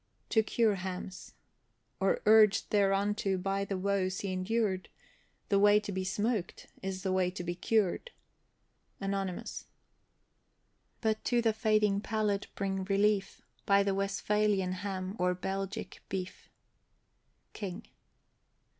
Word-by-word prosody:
TO 220 - +4
CURE 220 -1 +2
HAMS. 185 -7 -6 0.6
Or 195 0 +1
urged 215 -1 +5
thereunto 200 -1 +2
by 195 +2 -1
the 200 -1 -3
woes 185 -1 0
he 195 -2 -2
endured, 190 0 -1 0.6
The 200 - +4
way 205 +1 +6
to 205 -1 -6
be 190 -1 -2
smoked, 205 +1 -2 0.2
is 190 0 -4
the 190 - 0
way 185 -1 +2
to 180 -1 -6
be 175 0 -2
cured. 210 - 0 0.9
ANONYMOUS. 195 -2 -3 1.3
But 220 -1 0
to 240 -1 +2
the 225 -1 +3
fading 215 -2 +2
palate 210 -2 -1
bring 195 -1 -2
relief, 200 0 +1 0.2
By 200 0 +5
the 200 -1 +1
Westphalian 195 0 +1
ham 190 0 -4
or 180 0 +2
Belgic 195 +3 -4
beef. 190 -1 -5 1.0
KING. 195 -2 -6
195 Hz, 120 wpm, -31 LUFS, 190-210 Hz, 1.3 s, way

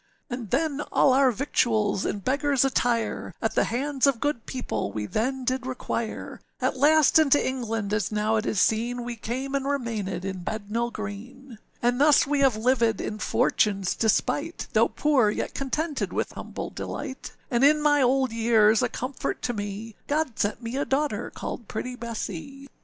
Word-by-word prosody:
âAnd 240 -4 -5
then 295 - 0
all 265 - +4
our 265 -1 +5
victuals 220 -5 +1
in 200 - -3
beggarâs 275 +3 +2
attire, 245 -3 0
At - - -1
the - - +2
hands 275 +3 0
of 270 -4 +2
good 290 -4 -2
people 255 -2 -3
we 105 -1 -3
then 255 - -2
did 255 0 -1
require; 235 -3 -4 0.2
At - - 0
last 305 +2 +5
into 290 -2 +5
England, 225 -5 -2
as 210 -2 0
now 215 +1 +1
it 215 - -2
is 210 - 0
seen, 240 +4 +1
We 240 0 -4
came, 255 +5 -4
and 275 -1 0
remainèd 230 -9 -2
in 190 -2 -4
Bednall 220 +4 -2
Green. 225 +4 -8 0.2
âAnd 245 +1 +2
thus 295 0 +6
we 290 0 0
have 270 -4 +4
livèd 230 0 +2
in 215 - -4
Fortuneâs 195 -3 +1
despite, 290 +8 0
Though - - +5
poor, 275 -8 +2
yet 210 - -3
contented 295 +3 -2
with - - -2
humble - - -6
delight, 260 - -6 0.2
And 240 +1 +2
in 300 +2 +6
my 295 -1 +3
old 260 0 +2
years, 225 -1 +4
a - - +1
comfort 255 +1 -4
to 245 - -1
me, 205 +1 -5
God 295 -5 -1
sent 205 +4 -1
me 230 +3 -4
a 280 - +1
daughter 290 +2 -1
called 235 - -6
pretty 250 +3 -4
Bessee. 235 +3 -6
245 Hz, 175 wpm, -26 LUFS, 220-275 Hz, 0.2 s, thus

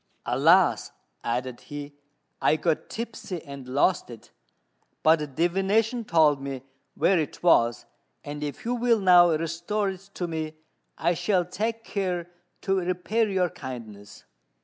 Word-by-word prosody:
"Alas!" 160 +9 +3 0.3
added 125 +1 -2
he, 145 0 -8 0.5
"I - - +4
got 160 0 -1
tipsy 220 -5 -5
and 140 -2 -9
lost 140 +7 +1
it; 115 -2 -12 0.7
but 150 -4 +3
divination 200 - +1
told 155 -6 +4
me 135 -2 -5 0.3
where 170 +4 +3
it 155 - -4
was, 120 -9 +3 0.4
and 145 0 -6
if 145 +7 -6
you 240 - 0
will 240 -2 +2
now 180 -2 +7
restore 170 +6 -1
it 190 +1 -12
to 175 - -2
me, 160 -1 -4 0.4
I 170 +2 +2
shall 180 0 +1
take 220 +6 -3
care 180 -5 -3 0.3
to 195 -1 +1
repay 185 +5 0
your 180 -3 +1
kindness." 110 -7 -9
170 Hz, 135 wpm, -26 LUFS, 145-195 Hz, 0.7 s, now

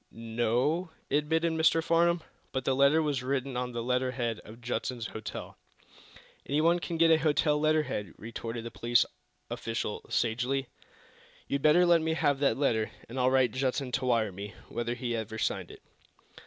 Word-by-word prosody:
"No 115 0 -2
o 160 +8 +1 0.2
o," - - +3
admitted 160 +3 +1
Mr. 160 0 +3
Farnum. 170 0 +3 0.3
"But 130 -1 -3
the 135 - +2
letter 140 +4 +4
was 145 -4 0
written 135 0 -2
on 125 0 -2
the 120 -1 -3
letter 125 +1 +1
head 120 -3 -2
of 110 +2 -13
Judson's 120 0 -3
hotel." 110 - -7 0.9
"Anyone 160 +5 +3
can 170 -1 -4
get 165 0 +5
a 160 - +6
hotel 150 -1 +2
letter 155 0 +3
head," 105 - -5
retorted 115 +1 -6
the 115 - -6
police 120 +1 +2 0.5
official, 115 -2 -3
sagely. 125 +3 0 0.8
"You'd 140 - -1
better 155 +5 +5
let 170 -1 +5
me 160 0 0
have 145 -3 +2
that 140 - +2
letter, 115 -6 +1 0.2
and 125 +3 -5
I'll 125 0 +4
write 130 -3 +3
Judson 130 +1 -1
to 130 - -1
wire 115 -4 +2
me 100 +2 -8
whether 120 0 -2
he 120 -1 -2
ever 110 -1 -4
signed - - -1
it." - - -13
130 Hz, 180 wpm, -30 LUFS, 120-155 Hz, 0.9 s, a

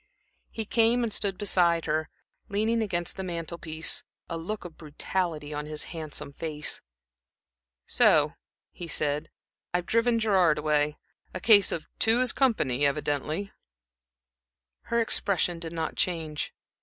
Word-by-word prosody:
He 225 - -5
came 230 +3 +3
and 225 -3 -2
stood 195 -3 +1
beside 175 -4 +3
her, 155 0 -1 0.4
leaning 220 +3 +1
against 175 -5 -2
the 190 - -3
mantel 170 -1 -5
piece, 160 0 -1 0.2
a 165 - -4
look 180 +5 -5
of 170 -2 -9
brutality 155 0 -3
on 150 0 -4
his 155 0 -2
handsome 150 -3 -6
face. 150 -1 -3 1.0
"So," - - +4 0.4
he 175 - -8
said. 150 -2 -1 0.5
"I've 175 0 0
driven 230 +2 +2
Gerard 190 -8 +3
away. 150 0 +1 0.4
A - - -2
case 200 +1 +6
of 160 - -4
'two 225 +2 +4
is 255 0 +3
company,' 180 - +2
evidently." 150 +6 0 1.3
Her 235 - +1
expression 190 -6 +1
did 165 -1 -6
not 165 -1 -3
change. 160 -4 -1
170 Hz, 135 wpm, -28 LUFS, 155-205 Hz, 1.3 s, case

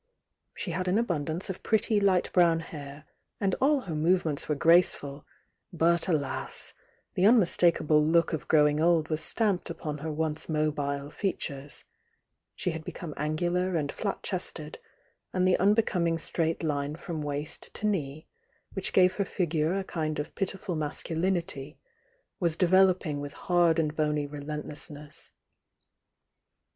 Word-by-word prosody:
She 180 - -4
had 185 +2 -2
an 180 +3 +2
abundance 170 -6 -1
of 190 - -5
pretty 220 0 +2
light 190 -3 +2
brown 170 -2 +4
hair, 145 -2 -9 0.3
and 195 -4 +1
all 285 +1 +3
her 175 -9 -6
movements 155 -2 +1
were 150 - +2
grace 170 +5 +5
ful, 140 +1 -9 0.4
but 170 +1 +2
aJasI— 145 -5 -1 0.4
the 185 - +4
unmistakable 170 -8 +4
look 165 +2 +3
of 160 - -4
growing 150 -1 +4
old 165 -2 +3
was 155 0 -1
stamped 205 -6 0
upon 150 -3 -5
her 155 +2 -4
once 155 +1 -2
mobile 145 -2 -1
features,— 145 -8 -4 0.7
she 180 - -1
had 160 -1 -6
become 160 -1 -7
angular 175 +5 -1
and 145 -3 -1
flat 205 - -4
chested, 165 -5 -4 0.5
and 185 0 +2
the 185 - +4
unbecoming 190 -5 +2
straight 165 0 -1
line 145 -1 -1
from 165 -1 -5
waist 145 +1 -5
to 215 - -4
knee, 155 -7 -2 0.5
which 195 - -2
gave 185 0 +4
her 200 - +2
figure 165 -2 0
a 195 - -1
kmd 155 -4 -3
of 150 +1 -4
pitiful 195 -1 -2
masculinity, 160 -1 -2 0.6
was 170 -3 +2
developing 185 -4 +3
with 145 0 -6
hard 175 -3 +2
and 155 -2 0
bony 150 -1 0
relentlessness. 150 0 -7
165 Hz, 140 wpm, -28 LUFS, 150-180 Hz, 0.7 s, grace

